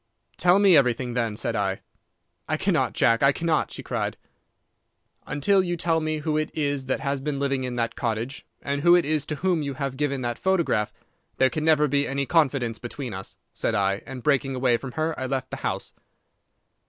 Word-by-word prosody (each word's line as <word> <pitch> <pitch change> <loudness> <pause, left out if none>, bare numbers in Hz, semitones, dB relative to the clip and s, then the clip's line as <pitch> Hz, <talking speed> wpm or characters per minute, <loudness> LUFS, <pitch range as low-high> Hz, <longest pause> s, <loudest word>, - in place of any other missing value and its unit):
"'Tell 180 +1 +5
me 200 -3 +6
everything, 125 -3 +2
then,' 115 -3 -1
said 115 - -2
I. 95 -2 -1 0.7
"'I - - +1
cannot, - - +1
Jack, 115 0 +3
I 140 - +6
cannot,' 160 +1 0
she - - -7
cried. - - -3 1.1
"'Until 190 +7 +3
you 175 -1 -2
tell 165 -1 +1
me 155 0 -1
who 155 0 0
it 155 - -2
is 145 -3 -1
that 130 - -1
has 140 0 -1
been 140 +1 -3
living 135 -2 0
in 125 -1 -4
that 115 -1 -1
cottage, 115 +4 -3 0.2
and 140 0 -2
who 175 +2 +6
it 175 - +3
is 150 -1 0
to 155 - -2
whom 175 +1 0
you 140 -2 -3
have 135 -1 -3
given 140 -2 -1
that 120 -1 -3
photograph, 170 - +1 0.5
there 130 0 +4
can 155 -1 -2
never 150 -2 +4
be 140 +1 +1
any 140 0 -1
confidence 135 -8 +1
between 125 -1 -6
us,' 95 +1 -7 0.2
said 115 - -1
I, 100 -1 +1
and 130 -2 -7
breaking 140 -2 +1
away 125 -1 +2
from 125 +2 -6
her, 160 +1 -1
I 130 - -2
left 135 -1 -3
the - - -4
house. - - -4
140 Hz, 205 wpm, -25 LUFS, 125-155 Hz, 1.1 s, me